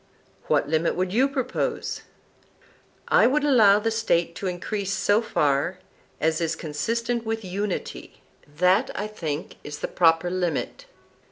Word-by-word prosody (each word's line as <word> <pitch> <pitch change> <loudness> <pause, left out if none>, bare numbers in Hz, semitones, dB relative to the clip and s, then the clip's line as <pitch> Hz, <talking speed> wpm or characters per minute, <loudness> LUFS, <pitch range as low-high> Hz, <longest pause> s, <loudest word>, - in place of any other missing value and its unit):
What - - +2
limit 160 +2 +1
would 185 +1 -1
you 255 +5 +4
propose? 260 -2 -2 1.1
I - - +5
would 285 +3 +1
allow 225 -9 +6
the 225 +2 -1
State 175 -7 +1
to 195 - -3
increase 195 +2 -3
so 200 +3 +2
far 150 -2 0 0.4
as 160 +1 +1
is 165 0 0
consistent 230 +10 -2
with 225 -2 -3
unity; 195 +2 -5 0.2
that, 180 +6 +2
I 205 - -2
think, 165 -8 -5
is 150 0 -7
the - - -3
proper 165 0 +3
limit. 185 - -2
185 Hz, 140 wpm, -25 LUFS, 165-225 Hz, 1.1 s, allow